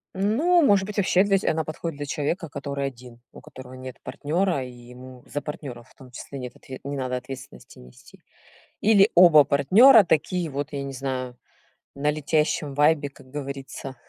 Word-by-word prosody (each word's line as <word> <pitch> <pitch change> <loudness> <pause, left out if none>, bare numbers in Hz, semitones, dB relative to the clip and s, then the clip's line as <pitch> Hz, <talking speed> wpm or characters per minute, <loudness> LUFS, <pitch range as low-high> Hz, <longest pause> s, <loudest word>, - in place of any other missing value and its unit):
Ну, 280 - +2
может 200 -7 +3
быть 210 - -7
вообще 190 -1 +3
для 200 -1 +2
здесь - - 0
она 160 0 -1
подходит 155 0 -6
для 145 - -5
человека, 160 +3 -3
который 140 0 -4
1. 125 -2 -12
У - - -14
которого 130 -1 -12
нет 130 -1 -9
партнёра, 150 +3 -1
и 125 - -9 0.2
ему 125 0 -13
за 145 - -4
партнёра, 135 -6 -8
в 130 - -24
том 130 - -16
числе 135 +2 -9
нет 125 -1 -8
отв - - -21 0.2
не 140 +1 -5
надо 130 -1 -2
ответственности 130 - -11
нести. 60 0 -17 0.6
Или 205 -1 +5
оба 170 -4 +7
партнёра 210 - +6
такие 175 +1 0
вот, 140 +1 -4
я 140 -1 -4
не 140 0 -6
знаю, 130 -1 -4 0.6
на 145 +2 0
летящем 150 -1 -1
вайбе, 145 0 +2
как 135 -1 -18
говорится, 135 -1 -7
145 Hz, 180 wpm, -24 LUFS, 130-170 Hz, 0.6 s, оба